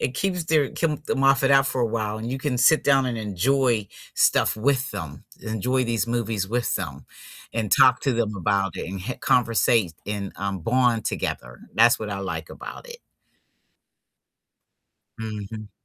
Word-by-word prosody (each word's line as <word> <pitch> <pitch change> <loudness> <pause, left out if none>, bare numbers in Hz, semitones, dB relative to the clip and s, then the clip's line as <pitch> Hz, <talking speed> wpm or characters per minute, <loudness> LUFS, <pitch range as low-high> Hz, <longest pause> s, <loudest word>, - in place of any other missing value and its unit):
It 125 - -1
keeps 180 +3 -1
their 155 -3 +2
keep 155 -2 -2
them 135 -3 -1
off 135 0 +4
it 135 - +4
out 135 0 +5
for 130 - -2
a 120 - +2
while, 110 -1 -2
and 110 +2 -5
you 130 - -2
can 135 -3 -2
sit 155 +6 +5
down 135 -2 +3
and 120 -2 -2
enjoy 110 +2 +1 0.3
stuff - - +3
with 135 +4 +1
them, 75 -3 -7 0.2
enjoy 125 +4 -1
these 115 -4 0
movies 115 -5 -1
with 120 +1 -1
them, - - -5 0.5
and 110 -3 -2
talk 130 0 +5
to 135 - 0
them 115 -3 -1
about 100 0 0
it, - - -5
and 95 0 -5
h 125 - -5
conversate 115 -5 +2
and, 100 -1 -4
um, 100 +1 -3
bond 120 +2 +1
together. - - -4
That's 120 +2 +5
what 105 -1 -5
I 100 - -3
like 85 -5 -5
about - - -9
it. 475 0 -9 2.2
Mhm. 110 -1 -7
115 Hz, 175 wpm, -24 LUFS, 105-130 Hz, 2.2 s, out